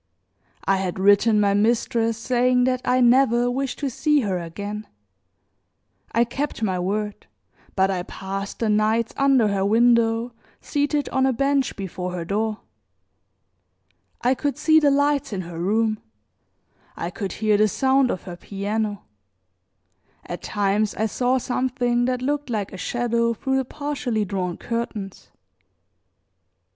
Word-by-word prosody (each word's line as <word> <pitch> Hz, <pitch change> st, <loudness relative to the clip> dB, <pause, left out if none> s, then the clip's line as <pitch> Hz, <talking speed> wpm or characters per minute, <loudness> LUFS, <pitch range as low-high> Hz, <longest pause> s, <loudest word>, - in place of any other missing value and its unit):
I 195 Hz, -, +3 dB
had 190 Hz, -1 st, -3 dB
written 205 Hz, +3 st, +4 dB
my 200 Hz, -1 st, +3 dB
mistress 230 Hz, +2 st, +1 dB
saying 250 Hz, +1 st, +2 dB
that 255 Hz, 0 st, +1 dB
I 255 Hz, +1 st, +2 dB
never 245 Hz, -1 st, +4 dB
wished 265 Hz, +1 st, -2 dB
to 280 Hz, -, -2 dB
see 300 Hz, +3 st, +2 dB
her 195 Hz, -5 st, -1 dB
again; 205 Hz, +5 st, -6 dB, 1.2 s
I 230 Hz, -, +3 dB
kept 270 Hz, +1 st, -4 dB
my 185 Hz, -4 st, 0 dB
word, 205 Hz, -, -3 dB, 0.5 s
but 190 Hz, 0 st, +3 dB
I 185 Hz, -2 st, -1 dB
passed 195 Hz, +2 st, -6 dB
the 230 Hz, -, -1 dB
nights 215 Hz, +2 st, +1 dB
under 270 Hz, -6 st, +3 dB
her 195 Hz, -1 st, 0 dB
window, 230 Hz, +2 st, +3 dB, 0.3 s
seated 290 Hz, 0 st, -1 dB
on 265 Hz, 0 st, +2 dB
a 265 Hz, -, +2 dB
bench 275 Hz, +2 st, +1 dB
before 180 Hz, -2 st, -5 dB
her 175 Hz, -2 st, -4 dB
door. 215 Hz, +3 st, -2 dB, 1.6 s
I 250 Hz, +2 st, +4 dB
could 285 Hz, +2 st, -2 dB
see 315 Hz, 0 st, +5 dB
the 295 Hz, -2 st, +4 dB
lights 285 Hz, -3 st, +1 dB
in 190 Hz, -, -2 dB
her 170 Hz, -1 st, -8 dB
room, 215 Hz, +4 st, +1 dB, 1.0 s
I 170 Hz, -, -4 dB
could 195 Hz, 0 st, -4 dB
hear 215 Hz, -1 st, +1 dB
the 215 Hz, +1 st, +4 dB
sound 265 Hz, +3 st, +2 dB
of 185 Hz, -, -3 dB
her 175 Hz, -2 st, -8 dB
piano, 205 Hz, +2 st, -3 dB, 1.2 s
at 175 Hz, -, -6 dB
times 205 Hz, +1 st, 0 dB
I 220 Hz, -, 0 dB
saw 250 Hz, +4 st, +1 dB
something 245 Hz, -1 st, 0 dB
that 250 Hz, 0 st, -1 dB
looked 290 Hz, 0 st, -1 dB
like 210 Hz, -5 st, -3 dB
a -, -, -6 dB
shadow 235 Hz, +3 st, 0 dB
through 265 Hz, +4 st, -1 dB
the 265 Hz, -, 0 dB
partially 255 Hz, -6 st, -2 dB
drawn 185 Hz, -3 st, -3 dB
curtains. 220 Hz, -4 st, -5 dB
225 Hz, 145 wpm, -23 LUFS, 200-255 Hz, 1.6 s, see